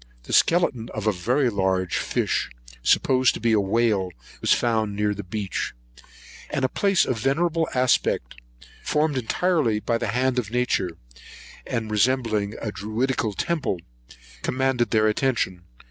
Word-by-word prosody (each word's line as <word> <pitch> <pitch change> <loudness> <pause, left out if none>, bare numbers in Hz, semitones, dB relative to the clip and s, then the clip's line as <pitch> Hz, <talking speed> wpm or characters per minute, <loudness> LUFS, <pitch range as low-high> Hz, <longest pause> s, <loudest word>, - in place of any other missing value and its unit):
The - - -7
skeleton 155 -9 +3
of 110 -1 -4
a 110 - +4
very 120 +8 +1
large 95 -3 0
fish, - - -1 0.3
supposed 130 - +3
to - - -5
be 115 - +1
a 110 - +4
whale, 100 -1 +1 0.3
was - - +1
found 110 -3 +1
near 105 0 +1
the 105 - -6
beach; 95 - -4 0.7
and 135 - 0
a - - +1
place 200 +4 +2
of 125 -4 -2
venerable 160 +6 +1
aspect, 125 - +1 0.5
formed 150 -1 +1
entirely 130 -2 +1
by 115 +2 -1
the - - -2
hand 125 +3 +1
of 110 -5 -4
Nature, 115 -8 0 0.7
and 110 -2 -3
resembling 110 -2 +1
a 110 - -3
Druidical 110 +4 -1
temple, 155 - -1 0.6
commanded 130 - 0
their 110 0 +3
attention. 105 -6 0
115 Hz, 145 wpm, -24 LUFS, 105-130 Hz, 0.7 s, a